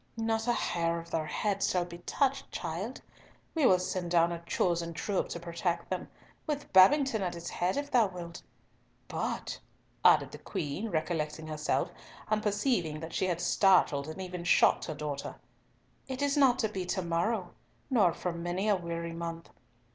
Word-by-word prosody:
"Not 225 0 0
a - - +4
hair 170 -6 0
of 170 0 -8
their 155 -1 -1
heads 200 +2 0
shall 180 -1 +1
be 170 0 -10
touched, 270 +8 0
child. 180 +9 -4 0.5
We 310 -6 +4
will 185 - +6
send 180 -1 -3
down 170 0 +4
a 170 -1 -4
chosen 170 -1 0
troop 195 +4 -1
to 170 - -4
protect 170 +1 -2
them, 185 - -2 0.4
with 295 -1 -3
Babington 225 +5 +6
at 180 -2 -2
its 170 0 -6
head 180 +7 0
if 285 0 -3
thou 235 -5 +5
wilt. 175 -2 -8 0.7
But," - - -3 0.4
added - - +6
the - - -9
Queen, 160 +10 -3
recollecting 155 -2 -2
herself, 155 +2 -1 0.4
and 215 0 +2
perceiving 205 - 0
that 160 +1 -7
she 185 - +1
had 175 -2 -1
startled 180 -6 +3
and 155 +4 -7
even 180 -2 -5
shocked 170 - +4
her 155 - -4
daughter, 145 -2 -4 0.7
"it 265 +1 -3
is 285 0 +2
not 265 -4 +5
to 225 - +1
be 195 -3 -3
to 185 0 -1
morrow, 175 +4 0 0.4
nor 210 -9 +5
for 175 +2 -3
many 175 +4 -2
a 210 - +5
weary 170 -2 -4
month. 165 0 -6
180 Hz, 175 wpm, -30 LUFS, 170-215 Hz, 0.7 s, will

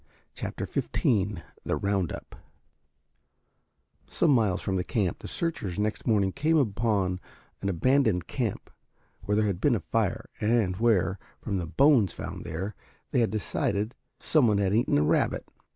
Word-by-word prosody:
CHAPTER - - -4
XV 100 -6 0 0.2
THE - - 0
ROUND 100 -3 0
UP - - -8 1.7
Some 165 - +2
miles 110 -8 +3
from 95 - -2
the 90 - 0
camp 95 -6 -1
the - - -8
searchers 130 - -3
next 105 +1 -2
morning 100 -4 +3
came 160 - +2
upon 105 -7 +1 0.4
an 100 - -1
abandoned 105 - +2
camp 120 -7 -3 0.5
where 105 - +1
there 110 0 +3
had 100 -3 -1
been 140 -5 +4
a - - 0
fire - - -1
and 105 -4 +2
where, 100 -5 +2 0.2
from 100 - -2
the 85 -3 -3
bones 130 - +4
found - - -6
there, 95 +6 -4 0.4
they 120 - +3
decided 105 +1 -1 0.3
some 150 -6 +3
one 105 -2 +3
had 100 -1 +1
eaten 115 -8 +3
a 75 - +3
rabbit. 75 - +1
105 Hz, 150 wpm, -28 LUFS, 95-120 Hz, 1.7 s, been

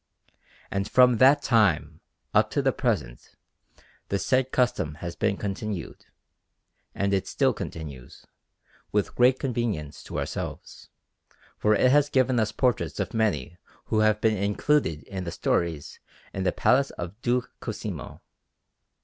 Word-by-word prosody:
And 100 0 -2
from 125 -2 +5
that 135 +5 +5
time 105 -9 +2 0.3
up - - +4
to - - -1
the - - +3
present - - -3 0.7
the 100 - +1
said 130 +4 +1
custom 120 - 0
has 85 +2 -6
been 100 -2 0
continued, 100 -2 -5 0.9
and 100 0 0
it 95 0 0
still - - +1
continues, 70 -6 -8 0.7
with 105 -1 0
great 125 +1 +4
convenience 115 - -3
to - - -6
ourselves, - - -6 0.7
for 105 0 +2
it 125 +4 +4
has 145 +1 +4
given 130 -2 +2
us 110 -1 +1
portraits 120 -1 0
of - - -2
many 90 - -1 0.4
who 110 - +4
have 110 0 +3
been 110 -1 +2
included 100 - +1
in 95 -2 -6
the 85 - -4
stories 80 -3 -2 0.3
in 95 -1 -3
the 90 - +3
Palace 135 +8 +2
of 90 +6 -8
Duke 125 0 0
Cosimo. - - -6
105 Hz, 140 wpm, -26 LUFS, 90-125 Hz, 0.9 s, from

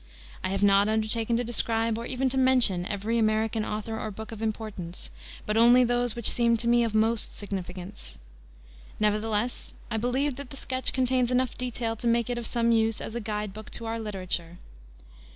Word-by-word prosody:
I 185 - -1
have 195 +1 -1
not 200 +1 +5
undertaken 220 +1 +1
to 245 - 0
describe 230 -1 +1
or 230 +1 -5
even 260 +1 0
to 265 - -2
mention 245 -9 +3
every 215 +3 -1
American 220 0 +1
author 215 +1 -4
or 215 - -3
book 220 +2 -8
of 220 -1 -8
importance, 215 -6 -4 0.3
but 210 +1 0
only 240 +2 +7
those 245 -1 +1
which 235 -2 +1
seemed 235 -1 +3
to 235 - -2
me 240 0 +4
of 225 -2 -1
most 220 +1 +1
significance. 190 - -6 0.8
Nevertheless 215 +2 -1 0.2
I 220 - 0
believe 255 +4 0
that 280 -2 -8
the 275 - -9
sketch 260 -1 -2
contains 255 -1 +1
enough 255 -1 +1
detail 240 -2 -3
to 235 - -2
make 235 +1 +2
it 240 - -2
of 235 - -3
some 235 -1 +1
use 225 -1 +2
as - - -6
a 235 - -3
guide 210 -2 -3
book 215 +1 -9
to 230 - -5
our 225 0 -3
literature. 185 -5 -3
225 Hz, 190 wpm, -27 LUFS, 210-240 Hz, 0.8 s, only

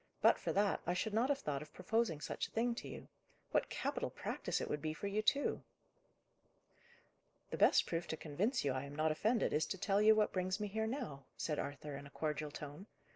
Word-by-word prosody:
"But - - +5
for - - -1
that, 200 0 +2
I 175 - +2
should 215 +3 -1
not 235 +5 +3
have 285 - +3
thought 145 - -2
of 150 0 -11
proposing 185 -4 0
such - - -2
a - - -21
thing 235 +2 +1
to 235 - -6
you. - - -8 0.4
What - - +2
capital - - -1
practice - - -2
it - - -2
would 150 - -2
be 155 0 -2
for 200 - -6
you, 200 +2 +1
too!" 280 +6 +2 1.9
"The - - -2
best - - +6
proof 170 0 -2
to 160 - -3
convince 200 - 0
you 140 - +3
I 130 +1 -2
am 140 +1 -8
not 155 +1 +2
offended, 215 +8 +2
is 155 - +2
to 190 - -3
tell 195 +2 +2
you 215 +1 +7
what 215 -1 +2
brings 185 +1 0
me 210 -1 -2
here 220 +2 -1
now," 220 - -4
said 150 -2 -1
Arthur 145 +1 -4
in 140 +1 -7
a - - -13
cordial 150 +1 -2
tone. 150 +6 -8
185 Hz, 225 wpm, -37 LUFS, 150-220 Hz, 1.9 s, you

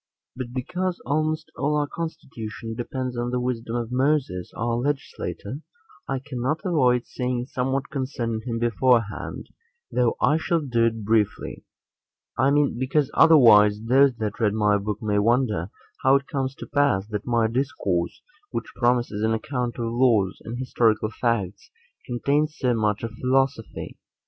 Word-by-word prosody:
4. 130 -1 -4
But 120 - -13
because 180 +8 -2
almost 155 +4 -1
all 150 +2 0
our 150 - +1
constitution 115 - -6
depends 125 +2 -4
on 120 0 -2
the 125 0 -1
wisdom 120 -2 -3
of 120 -1 -3
Moses, 130 - 0
our 120 +1 -1
legislator, 135 -2 -3 0.5
I 135 - -1
cannot 130 +2 -3
avoid 125 -9 +2
saying 125 -1 -2
somewhat 130 +2 -1
concerning 125 -5 -2
him 115 -1 -3
beforehand, 115 -1 0 0.4
though 125 -2 +1
I 150 - +3
shall 165 +1 0
do 120 -5 +1
it 115 -1 -3
briefly; 110 -1 0 0.7
I 130 +3 +3
mean, 140 -4 +2
because 135 +2 +1
otherwise 110 -10 +7
those 130 +2 +4
that 110 -2 -4
read 105 -2 +2
my 105 -1 +3
book 105 +1 -4
may 105 -1 +1
wonder 110 -5 +1 0.3
how 135 +1 +5
it 140 0 +1
comes 135 -1 -3
to - - -8
pass, 140 -10 +2
that 105 +1 -4
my 120 -2 +2
discourse, 110 -8 -1 0.3
which - - -5
promises 120 -4 +1
an 110 +1 +2
account 125 -1 -3
of 120 - -2
laws 115 -5 +2
and 115 +2 -5
historical 115 -4 +1
facts, 110 -6 -2 0.4
contains 145 +5 0
so 125 -2 +1
much 105 -2 0
of 115 - -3
philosophy. 130 -2 -1
120 Hz, 155 wpm, -24 LUFS, 110-135 Hz, 0.7 s, otherwise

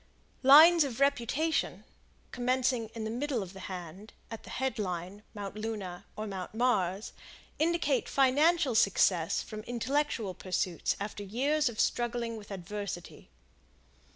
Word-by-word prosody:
Lines 310 +5 +8
of 260 -3 -4
Reputation, 280 +3 0 0.5
commencing 250 -2 0
in 225 - -4
the 220 - -3
middle 250 -2 -2
of 185 0 -10
the 190 - -10
hand, 185 +3 -8 0.2
at 225 - -6
the - - -13
Head 265 -2 -2
Line, 185 +1 -4
Mount 200 -1 -6
Luna 210 -5 -5
or 215 - -4
Mount 195 -1 -6
Mars, 210 -5 0 0.5
indicate 315 -4 +1
financial 280 +2 +3
success 185 -4 +3
from 215 -1 -7
intellectual 240 -2 -1
pursuits 180 -2 -1
after 205 +1 -5
years 265 +8 +1
of 220 - -9
struggling 240 -1 0
with 210 -2 -10
adversity. 195 - -7
225 Hz, 130 wpm, -30 LUFS, 195-265 Hz, 0.5 s, Lines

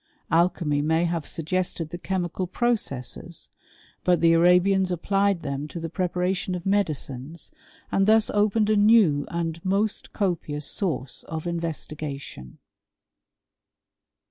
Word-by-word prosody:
Alchymy 165 -3 +2
may 160 +3 +2
haire 170 -2 -2
suggested 165 -1 -2
the 175 - -5
chemical 180 -1 -2
processes 205 - -2 0.3
— - - -30
^but 180 -1 +4
the 165 0 +5
Arabians 180 +3 +4
applied 195 +1 +1
them 140 0 -3
to 170 - -7
the 165 -1 -5
preparation 180 +1 -1
of 180 +1 -6
medicines, 155 -6 -2 0.4
and 195 +1 +2
thus 220 0 +4
opened 210 +1 +2
a - - +4
new 205 -9 +4
and 165 -1 -3
most 200 +3 0
copious 160 -7 -2
source 145 -9 -2
of 160 -1 -5
inves 170 -2 -3
tigation. 140 - -8
175 Hz, 125 wpm, -25 LUFS, 155-195 Hz, 0.4 s, the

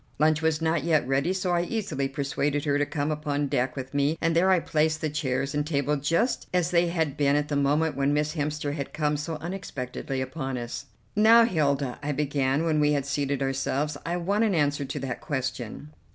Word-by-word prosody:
Lunch 155 +1 +3
was 160 0 +1
not 160 -2 +1
yet 155 -5 +2
ready, 135 +6 +1
so 185 -1 -1
I 175 -1 +2
easily 175 -8 -2
persuaded 140 +1 -1
her 145 -1 +2
to 145 - +1
come 150 0 -1
upon 145 -1 -1
deck 130 -2 0
with 130 0 -6
me, 145 +3 +1
and 165 -1 +1
there 180 +3 +4
I 185 -2 +5
placed 155 -1 +1
the 155 -1 -2
chairs 135 -2 -1
and 150 0 +1
table 145 -1 0
just 165 - 0
as 180 -1 +1
they 175 0 +3
had 160 -5 -1
been 140 -1 +3
at 150 0 0
the 145 - -1
moment 145 +2 +2
when 140 +1 +1
Miss 150 +1 0
Hemster 150 -2 -2
had 140 -2 -5
come 150 -1 0
so 150 +2 -3
unexpectedly 150 -6 -5
upon 130 0 -3
us. 120 -1 -6 0.3
"Now, 225 +3 +7
Hilda," 140 - 0
I 145 +1 -2
began 140 0 0
when 155 -2 +2
we 150 0 +3
had 140 -2 0
seated 140 -1 -1
ourselves, 135 +2 -1
"I 170 +1 -2
want 200 +5 +1
an 210 -5 +2
answer 145 -2 +1
to 140 +2 -4
that 135 -2 -4
question." 130 0 -4
150 Hz, 210 wpm, -26 LUFS, 140-160 Hz, 0.3 s, Now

